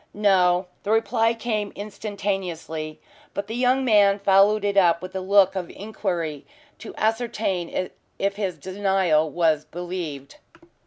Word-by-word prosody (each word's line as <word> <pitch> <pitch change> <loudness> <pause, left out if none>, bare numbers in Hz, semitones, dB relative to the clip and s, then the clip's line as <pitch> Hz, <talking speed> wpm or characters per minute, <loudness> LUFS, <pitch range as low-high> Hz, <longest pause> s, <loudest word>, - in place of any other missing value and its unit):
"No." 185 -3 +3 0.2
The 205 - -6
reply 225 +1 +2
came 215 -3 -2
instantaneously, 195 -6 -4 0.4
but 200 - -2
the 220 - -7
young 255 +2 +2
man 205 -4 +5
followed 200 +1 +4
it 200 0 0
up 175 -4 +4
with 185 +1 -9
a - - -1
look 195 0 +4
of 180 -3 -3
inquiry 175 -8 -4 0.4
to 225 - -9
ascertain 215 -6 -1 0.3
if 200 0 -1
his 195 -5 -3
denial 185 -2 +1
was 160 -2 +1
believed. 175 - -6
195 Hz, 135 wpm, -24 LUFS, 175-210 Hz, 0.4 s, man